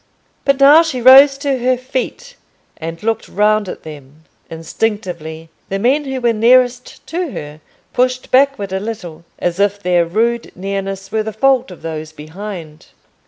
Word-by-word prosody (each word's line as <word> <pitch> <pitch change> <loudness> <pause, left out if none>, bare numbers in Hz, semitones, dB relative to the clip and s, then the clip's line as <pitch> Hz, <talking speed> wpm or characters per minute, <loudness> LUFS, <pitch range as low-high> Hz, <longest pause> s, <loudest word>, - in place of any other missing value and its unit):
But 275 -1 +2
now 285 +4 +8
she 325 -6 -3
rose 270 +3 +8
to 275 -2 -1
her 250 +1 +1
feet, 265 - -5 0.4
and 165 +3 -7
looked 225 0 -1
round 210 -1 +1
at - - -8
them. 150 0 -12 0.3
Instinctively 165 -2 -4 0.2
the 195 - -1
men 265 +8 +1
who 265 -1 -3
were 240 -2 +1
nearest 245 +2 +2
to 345 0 -3
her 150 +1 -8 0.3
pushed 255 0 0
backward 255 -7 +2
a 190 - -1
little, 195 -7 -7
as 175 +1 -2
if 205 0 +2
their 180 -3 +2
rude 230 +7 -1
nearness 195 0 -5
were 220 - 0
the 220 0 -4
fault 265 0 +2
of 180 - -13
those 155 -1 -6
behind. 160 0 -9
215 Hz, 160 wpm, -17 LUFS, 175-255 Hz, 0.4 s, now